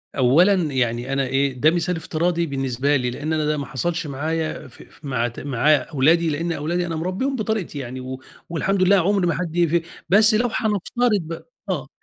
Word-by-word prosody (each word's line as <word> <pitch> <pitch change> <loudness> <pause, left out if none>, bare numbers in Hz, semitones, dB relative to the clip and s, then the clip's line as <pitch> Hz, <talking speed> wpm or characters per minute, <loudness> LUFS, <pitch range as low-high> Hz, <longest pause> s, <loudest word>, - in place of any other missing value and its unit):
أولًا 150 +10 +5 0.2
يعني 120 +1 -1
أنا 135 0 +1
إيه 135 +1 +1
ده 150 +5 +3
مثال 175 +1 0
افتراضي 170 +1 -1
بالنسبة 135 0 0
لي، 125 -2 0
لإن 145 +6 -3
أنا 155 -1 0
ده 150 0 0
ما 140 - -3
حصلش 165 +4 -2
معايا 155 +3 -3
فأ - - -15
ف 150 - -17
مع 125 -4 0
ت 120 - -8
مع 145 +2 +3
أولادي، 155 +4 +2
لإن 165 +3 -2
أولادي 170 +3 -1
أنا 165 -1 -3
مربيهم 185 - -2
بطريقتي 215 - -2
يعني 130 0 -6
و 130 0 -6 0.3
والحمد 185 +3 0
لله 195 +2 +5
عُمر 190 +1 +2
ما 170 - +2
حد 170 -2 -4
ي 175 -1 +3
في 170 +1 +1 0.3
بس 210 +4 +5
لو 240 +3 +2
هنفترض 215 +2 +1
ب 165 0 -7 0.3
آه، - - -2
160 Hz, 200 wpm, -22 LUFS, 135-180 Hz, 0.3 s, أولًا